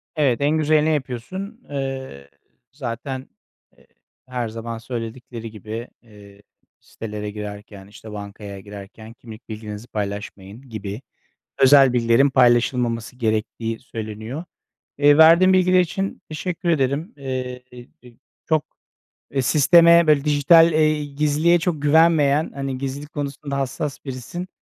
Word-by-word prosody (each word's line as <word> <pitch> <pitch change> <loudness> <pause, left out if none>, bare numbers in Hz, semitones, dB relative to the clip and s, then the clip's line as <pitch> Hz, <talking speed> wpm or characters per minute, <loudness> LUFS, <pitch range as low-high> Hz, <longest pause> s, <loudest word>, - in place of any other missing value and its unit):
Evet, 140 -5 +1
en 150 +2 +2
güzelini 155 0 +2
yapıyorsun. 155 - -5
Eee, 135 - -5 0.4
zaten, 130 0 -6 0.5
eee, - - -25 0.4
her 125 -2 -3
zaman 115 +1 -6
söyledikleri 115 0 -7
gibi, 110 +3 -7
eee, 105 -3 -17 0.4
sitelere 105 -1 -7
girerken, 105 -1 -9
işte, 110 +1 -12
bankaya 100 -1 -8
girerken 105 +3 -11
kimlik 115 0 -13
bilginizi 105 +1 -7
paylaşmayın 100 +1 -6
gibi 105 0 -6 0.6
özel 135 -1 +6
bilgilerin 120 +3 +3
paylaşılmaması 120 -1 +2
gerektiği 115 -1 -2
söyleniyor. 110 +5 -7 0.5
Eee, 145 +1 +5
verdiğin 170 +4 +7
bilgiler 185 0 +4
için 195 +3 -3
teşekkür 170 +3 -4
ederim. 150 - 0
Eee, 130 -2 -5 0.9
çok, 155 -2 +2 0.7
eee, 135 - 0
sisteme 170 +5 +6
böyle 150 -2 +4
dijital, 155 +3 +5
eee, 155 -1 +2
gizliliğe 150 +4 +2
çok 160 -2 -2
güvenmeyen, 150 -1 +3
hani 135 -1 -4
gizlilik 140 +3 -6
konusunda 140 -1 -4
hassas 135 +1 -4
birisin. 135 +8 -6
130 Hz, 115 wpm, -22 LUFS, 110-150 Hz, 0.9 s, verdiğin